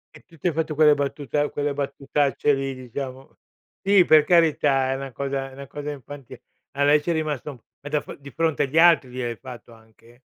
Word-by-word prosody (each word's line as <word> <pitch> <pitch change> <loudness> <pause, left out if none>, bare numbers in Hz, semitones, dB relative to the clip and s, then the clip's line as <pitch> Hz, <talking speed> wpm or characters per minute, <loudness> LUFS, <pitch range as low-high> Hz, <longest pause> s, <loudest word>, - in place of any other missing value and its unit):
E - - -13
tu 170 - -19
ti 165 - -2
hai 165 - -4
fatto 155 -1 -2
quelle 150 0 +6
battuta 145 +1 -2
quelle 145 0 -2
battutacce 140 +1 0
lì, 135 0 -3
diciamo. 130 +1 -8 0.5
Sì, 195 -2 +5
per 155 -1 +6
carità, 145 -6 +3
è 135 - 0
una 135 0 -6
cosa, 135 +1 -3
è 130 - -15
una 140 0 -10
cosa 145 +2 -6
infantile. 140 -1 -11 0.3
A 140 - -1
lei 145 +1 +4
ci 170 - -5
è - - +2
rimasto 150 -5 -4 0.2
ma 145 - -7
da 150 0 +1
f - - -10
di 140 0 -11
fronte 160 0 0
agli 140 +3 -3
altri 165 -6 +5
gliel'hai 125 -2 -4
fatto 120 -3 -11
anche? 115 +2 -21
140 Hz, 210 wpm, -23 LUFS, 135-150 Hz, 0.5 s, quelle